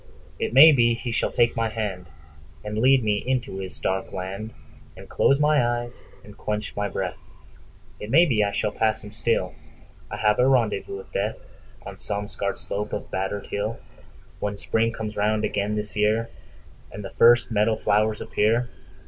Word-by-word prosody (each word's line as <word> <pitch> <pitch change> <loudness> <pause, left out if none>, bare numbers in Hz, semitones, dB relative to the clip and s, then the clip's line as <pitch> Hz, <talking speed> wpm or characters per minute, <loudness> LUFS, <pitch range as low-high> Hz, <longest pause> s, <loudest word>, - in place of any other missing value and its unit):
It - - -1
may 145 +6 +9
be 120 -4 +3
he 120 +1 -5
shall 115 - 0
take 120 -1 +2
my 115 -1 0
handAnd 105 -5 -4 0.7
lead 130 0 +5
me 105 -1 +1
into 125 -5 -2
his 95 -1 -7
dark 95 0 -1
landAnd 95 +4 -6 0.6
close 140 - +3
my 150 -2 +3
eyes 120 0 -3 0.2
and 105 - -13
quench 105 0 -4
my 105 0 -1
breath—It 105 - -9
may 165 +8 +6
be 115 -9 +2
I 100 - 0
shall 105 +1 -1
pass 110 0 0
him 105 - -10
still.I 105 -4 -4
have 105 -1 +2
a 125 - +5
rendezvous 115 -7 +1
with 95 - -12
DeathOn 105 +3 -6
some 105 0 -3
scarred 100 - -3
slope 105 +1 -5
of - - -5
battered 95 +2 -3
hill, 105 +3 -2 0.6
When 105 0 -3
Spring 115 +2 0
comes 110 -2 -6
round 105 +1 +1
again 105 0 -1
this 105 0 -3
yearAnd 110 +2 +1 0.7
the - - -8
first 120 +1 +5
meadow 110 +1 +2
flowers 105 0 +1
appear. 115 +4 +1
110 Hz, 160 wpm, -24 LUFS, 105-120 Hz, 0.7 s, may